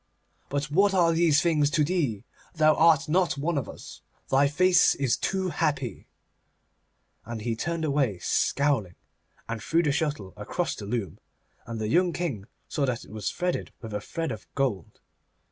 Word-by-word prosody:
But 145 Hz, +1 st, -2 dB
what 195 Hz, +4 st, +3 dB
are 170 Hz, -2 st, +4 dB
these 160 Hz, -3 st, +3 dB
things 155 Hz, -4 st, +3 dB
to 150 Hz, 0 st, +2 dB
thee? 145 Hz, -, -1 dB, 0.3 s
Thou 155 Hz, -1 st, +5 dB
art 160 Hz, -3 st, +4 dB
not 175 Hz, 0 st, +1 dB
one 160 Hz, +4 st, -1 dB
of 140 Hz, -5 st, -2 dB
us. -, -, -11 dB, 0.3 s
Thy 135 Hz, +1 st, +5 dB
face 180 Hz, +4 st, +4 dB
is 135 Hz, -4 st, +1 dB
too 190 Hz, -1 st, -1 dB
happy.' 140 Hz, -7 st, -2 dB, 1.2 s
And 115 Hz, -2 st, -6 dB
he 115 Hz, +1 st, -2 dB
turned 165 Hz, +6 st, -2 dB
away 140 Hz, -9 st, +1 dB
scowling, 130 Hz, -3 st, 0 dB, 0.5 s
and 115 Hz, -1 st, -4 dB
threw 165 Hz, +8 st, +1 dB
the 150 Hz, -, +2 dB
shuttle 145 Hz, -, -2 dB
across -, -, -2 dB
the 100 Hz, -, -8 dB
loom, 110 Hz, -3 st, -3 dB, 0.5 s
and 115 Hz, -1 st, -5 dB
the 110 Hz, -, -2 dB
young 175 Hz, +8 st, +2 dB
King 140 Hz, -, -3 dB, 0.2 s
saw 140 Hz, -2 st, -1 dB
that 120 Hz, -2 st, -2 dB
it -, -, -15 dB
was 105 Hz, -2 st, -3 dB
threaded 180 Hz, 0 st, -2 dB
with 110 Hz, -3 st, -8 dB
a 105 Hz, -, -2 dB
thread 165 Hz, +8 st, -4 dB
of 110 Hz, -1 st, -7 dB
gold. 125 Hz, -, -2 dB
145 Hz, 170 wpm, -27 LUFS, 115-165 Hz, 1.2 s, Thou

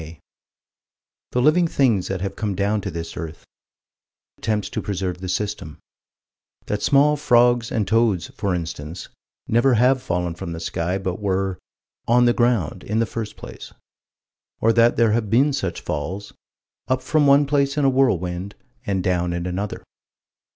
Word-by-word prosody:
7 80 Hz, +1 st, -10 dB, 1.2 s
The 125 Hz, -, +2 dB
living 170 Hz, +4 st, +4 dB
things 120 Hz, -, +2 dB
that 95 Hz, -2 st, -3 dB
have 100 Hz, 0 st, -3 dB
come 105 Hz, -3 st, -2 dB
down 100 Hz, +2 st, 0 dB
to 100 Hz, -, -4 dB
this 85 Hz, -1 st, -6 dB
earth: 80 Hz, -1 st, -7 dB, 0.9 s
Attempts 105 Hz, -1 st, -1 dB
to -, -, -3 dB
preserve 95 Hz, -3 st, -3 dB
the 95 Hz, -, -5 dB
system: 90 Hz, -5 st, -3 dB, 0.9 s
That 105 Hz, 0 st, -2 dB
small 145 Hz, +2 st, +4 dB
frogs 120 Hz, -4 st, +3 dB
and 110 Hz, -3 st, 0 dB
toads, 110 Hz, -6 st, +2 dB
for 100 Hz, -3 st, -2 dB
instance, 85 Hz, 0 st, -6 dB, 0.4 s
never 120 Hz, +3 st, +3 dB
have 125 Hz, +3 st, +3 dB
fallen 90 Hz, -3 st, -2 dB
from 85 Hz, 0 st, -6 dB
the 80 Hz, -, -6 dB
sky, 85 Hz, +2 st, -2 dB
but 95 Hz, -1 st, -4 dB
were 95 Hz, -2 st, -1 dB, 0.5 s
"on 120 Hz, +1 st, +5 dB
the 120 Hz, -, +4 dB
ground, 115 Hz, -9 st, 0 dB
in 105 Hz, -, -2 dB
the 115 Hz, -, +3 dB
first 110 Hz, -1 st, -6 dB
place"; -, -, -10 dB, 0.9 s
or 115 Hz, +1 st, +3 dB
that 115 Hz, +1 st, +4 dB
there 115 Hz, -2 st, +4 dB
have 110 Hz, -1 st, 0 dB
been 135 Hz, +7 st, +3 dB
such 95 Hz, -10 st, -3 dB
falls 90 Hz, +7 st, -4 dB, 0.5 s
"up 130 Hz, 0 st, 0 dB
from 150 Hz, +2 st, +2 dB
one 140 Hz, +1 st, +6 dB
place 140 Hz, 0 st, +1 dB
in 145 Hz, -, +2 dB
a -, -, +5 dB
whirlwind, 95 Hz, -7 st, 0 dB, 0.3 s
and 95 Hz, -2 st, 0 dB
down 90 Hz, -1 st, 0 dB
in 85 Hz, 0 st, -3 dB
another." 95 Hz, +3 st, -4 dB
105 Hz, 165 wpm, -22 LUFS, 90-120 Hz, 1.2 s, one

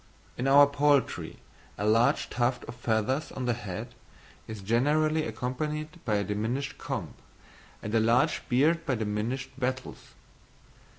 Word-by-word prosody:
In 125 Hz, -, -2 dB
our 140 Hz, +1 st, +8 dB
poultry, 145 Hz, -1 st, +1 dB, 0.4 s
a 105 Hz, -, -2 dB
large 115 Hz, +3 st, +3 dB
tuft 120 Hz, 0 st, 0 dB
of -, -, -8 dB
feathers 120 Hz, +4 st, -1 dB
on 130 Hz, -, -4 dB
the 120 Hz, -, +2 dB
head 105 Hz, -6 st, -6 dB, 0.5 s
is 110 Hz, -2 st, -7 dB
generally 155 Hz, +8 st, +2 dB
accompanied 150 Hz, +6 st, -4 dB
by 110 Hz, -3 st, +1 dB
a 100 Hz, -, +1 dB
diminished 115 Hz, +7 st, -3 dB
comb, -, -, -4 dB, 0.7 s
and 105 Hz, -, -4 dB
a 115 Hz, -, +4 dB
large 115 Hz, +2 st, +3 dB
beard 155 Hz, +7 st, +3 dB
by 130 Hz, -, 0 dB
diminished 115 Hz, +5 st, -2 dB
wattles. 130 Hz, 0 st, -4 dB
125 Hz, 135 wpm, -28 LUFS, 110-145 Hz, 0.7 s, our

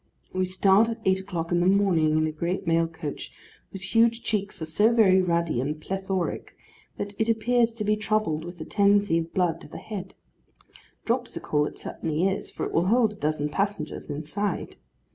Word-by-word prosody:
We 185 Hz, 0 st, +1 dB
start 195 Hz, +4 st, +4 dB
at 230 Hz, 0 st, -4 dB
eight 190 Hz, 0 st, +3 dB
o'clock 180 Hz, -4 st, -4 dB
in 175 Hz, -, +3 dB
the 175 Hz, -, +2 dB
morning, 180 Hz, -6 st, +3 dB
in 155 Hz, -, +2 dB
a 155 Hz, -, -1 dB
great 170 Hz, +5 st, -3 dB
mail 165 Hz, 0 st, +2 dB
coach, 160 Hz, -3 st, -7 dB, 0.4 s
whose 195 Hz, -1 st, -5 dB
huge 230 Hz, 0 st, +3 dB
cheeks 205 Hz, -2 st, -2 dB
are 160 Hz, -, -3 dB
so 205 Hz, +9 st, +3 dB
very 195 Hz, -5 st, +5 dB
ruddy 170 Hz, -7 st, 0 dB
and 150 Hz, +3 st, -3 dB
plethoric, 190 Hz, +1 st, -3 dB, 0.4 s
that 205 Hz, 0 st, -4 dB
it 220 Hz, +1 st, +1 dB
appears 230 Hz, +1 st, +2 dB
to 225 Hz, -2 st, -4 dB
be 210 Hz, +1 st, +2 dB
troubled 215 Hz, -7 st, 0 dB
with 175 Hz, +1 st, -9 dB
a 160 Hz, -, -6 dB
tendency 200 Hz, -4 st, +3 dB
of 165 Hz, 0 st, -5 dB
blood 180 Hz, -3 st, 0 dB
to -, -, -10 dB
the -, -, -9 dB
head. 190 Hz, -4 st, -7 dB, 0.9 s
Dropsical 230 Hz, -, 0 dB
it -, -, -9 dB
certainly 160 Hz, +3 st, -2 dB
is, 195 Hz, -, -2 dB
for -, -, -4 dB
it -, -, -4 dB
will 170 Hz, +2 st, +2 dB
hold 225 Hz, 0 st, +3 dB
a -, -, -14 dB
dozen 150 Hz, -4 st, -1 dB
passengers 195 Hz, -4 st, -3 dB
inside. 155 Hz, +8 st, -3 dB
190 Hz, 190 wpm, -26 LUFS, 165-210 Hz, 0.9 s, very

